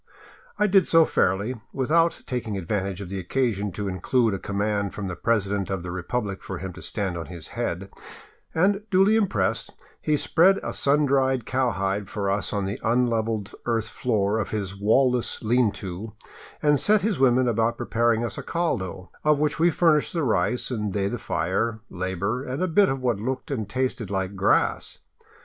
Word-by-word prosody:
I 210 - +3
did 195 -3 +4
so 165 -1 +6
fairly, 105 +4 0
without 165 +6 +1
taking 115 -5 -3
advantage 95 +1 -2
of 95 - -7
the 95 0 -4
occasion 105 0 -1
to 100 +2 -3
include 110 +5 +1
a 95 - -3
com 100 +1 -5
mand 100 -1 -1
from 100 -2 -4
the 90 - -4
president 100 -4 0
of 95 -3 -3
the 90 - -5
republic 95 +2 -3
for 95 - -6
him 95 +1 -6
to 90 - -11
stand 100 -4 -3
on 80 - -6
his 85 -4 -8
head, 95 +3 -4 0.6
and, 195 +5 +3
duly 195 +3 +4
impressed, 115 - 0 0.3
he 150 -1 +1
spread 185 +6 +4
a - - -3
sun 145 +2 +2
dried 130 -3 +1
cowhide 100 -6 -1
for 100 -2 -1
us 100 +1 0
on 100 -2 -1
the 100 +1 -4
unlevelled 115 -3 0
earth 115 -2 0
floor 110 -3 0
of 105 - -2
his 100 -3 -3
wall 115 +6 +3
less 125 -1 -2
lean 120 0 +3
to, 100 +4 -7 0.5
and 150 -2 +4
set 210 -1 +3
his 210 -6 0
women 130 -1 +4
to 115 -1 +2
preparing 115 0 +1
us 110 - -5
a - - -6
caldo, 95 - -2
of 150 -1 +4
which 150 +2 0
we 170 +2 +5
furnished 155 -2 +2
the 165 -3 0
rice 115 +1 0
and 105 -5 -2
they 100 -1 0
the 120 +4 -3
fire, 110 +5 -1
labor, 95 +6 -2
and 135 +6 -3
a - - +1
bit 195 +4 +4
of 135 0 -2
what 120 -5 0
looked 130 +5 -4
and 110 -7 -3
tasted 125 -2 -2
like 95 0 -2
grass. 95 - +1
110 Hz, 190 wpm, -25 LUFS, 100-130 Hz, 0.6 s, so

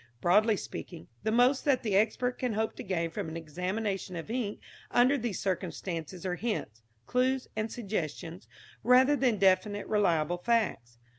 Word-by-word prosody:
Broadly 210 - +4
speaking, 170 -3 -8
the 220 - 0
most 250 +4 +4
that 275 -4 +2
the 210 -4 0
expert 245 +4 +1
can 250 -3 -1
hope 220 +1 -1
to - - -5
gain 170 -3 -1
from 160 - -4
an 160 - -5
examination 185 +4 -3
of 170 +6 -6
ink 230 -4 -2 0.3
under 250 +4 +4
these 235 -7 -2
circumstances 180 -2 -3
are 180 - 0
hints, 185 - -3 0.2
clues 255 - +1
and 215 0 -2
suggestions 180 - -4 0.4
rather 260 +4 +6
than 250 -6 +2
definite, 195 +2 +2
reliable 175 -5 +1
facts. 180 - 0
205 Hz, 155 wpm, -30 LUFS, 175-235 Hz, 0.4 s, rather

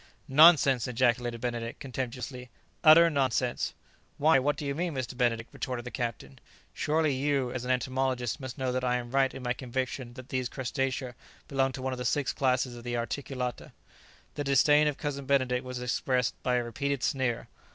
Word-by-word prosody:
"Nonsense!" 140 -3 +6
ejaculated 120 -1 0
Benedict 120 -1 -3
contemptuously; 125 -1 -5 0.3
"utter 165 +2 +8
nonsense!" 130 -3 0 0.4
"Why? 155 -1 +5
what 145 +2 0
do 150 - -5
you 140 - -1
mean, 170 +1 -2
Mr. 130 -1 -4
Benedict?" 115 -2 0
retorted 125 -2 -4
the 125 - -6
captain; 115 - -5 0.3
"surely 155 0 +1
you, 135 -1 0
as 125 -1 -4
an - - -5
entomologist, 130 0 0
must 130 -1 -7
know 130 -2 -1
that 130 0 -2
I 125 -1 +1
am 120 -1 -4
right 135 0 +3
in 130 - -9
my 125 0 0
conviction 130 -1 -4
that 130 -1 -11
these 130 -1 -1
crustacea 130 0 -2 0.3
belong 135 -1 +1
to 130 - -6
one 130 0 -1
of 125 - -6
the 125 - -4
six 140 +3 0
classes 130 -2 0
of 120 - -10
the 120 0 -2
articulata." 125 +1 -4 0.6
The 145 - -3
disdain 145 +2 +4
of 150 -1 -1
Cousin 140 -3 -4
Benedict 130 -2 +2
was 125 -1 -6
expressed 125 0 0
by 125 -1 +1
a 120 - +1
repeated 140 +2 -2
sneer. 130 -4 -1
130 Hz, 185 wpm, -29 LUFS, 125-140 Hz, 0.6 s, utter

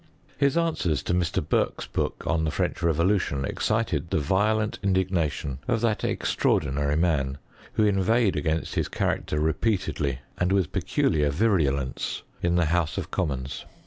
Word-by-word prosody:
His 140 +2 +2
answer 160 - +1
to 85 - -2
Mr. 90 -2 0
Burke's - - 0
book - - -3
on 80 -1 +1
the 80 - +1
French - - -2
revolution 85 -3 +1
excited 90 -8 -1
the - - +1
violent 105 +8 +1
indignation 85 -8 0
of 115 -2 +1
that 115 -3 0
extraordinary 70 +1 +1
man, 70 -5 +1 0.4
who 110 - +3
inveighed 105 +2 +3
^;ainst 80 0 -1
his - - 0
character 75 - -1
repeatedly, 80 - 0 0.2
and 90 +1 +1
with 95 -5 +2
peculiar 75 -2 +1
virulence, 70 - 0 0.2
iu. 85 - +1
the 85 0 +3
house 80 -1 0
of - - -4
commons. 70 -6 -3
85 Hz, 145 wpm, -26 LUFS, 75-100 Hz, 0.4 s, who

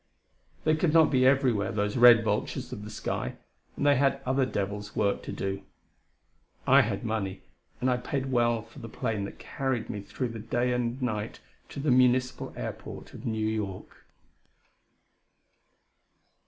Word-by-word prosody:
They 155 0 +3
could 155 0 +1
not 160 -2 +6
be 130 -2 +4
everywhere, 125 -7 +2
those 105 0 -1
red 120 -2 +8
vultures 120 +4 -2
of 105 - -7
the 105 - -7
sky, 105 - -3 0.4
and 140 - -1
they 145 -2 +5
had 135 0 +2
other 130 0 +2
devils' 105 -1 -4
work 100 -1 +1
to - - -7
do. 95 0 -3 1.0
I 135 +2 +7
had 105 -4 -2
money, 100 -4 -3 0.4
and 125 - 0
I 125 -1 +3
paid 135 +1 -3
well 120 -2 +2
for 115 0 -14
the 115 - -8
plane 110 -2 -2
that - - -9
carried 130 -4 -3
me 105 - -5
through 125 +5 -4
that 115 -2 -9
day 125 +1 +1
and 125 +1 -1
a 130 - -1
night 105 -3 -3 0.3
to - - -7
the 140 -1 +1
Municipal 125 0 +2
Airport - - -7
of - - -7
New 110 -1 -1
York. 105 -4 -4
120 Hz, 165 wpm, -28 LUFS, 105-130 Hz, 1.0 s, red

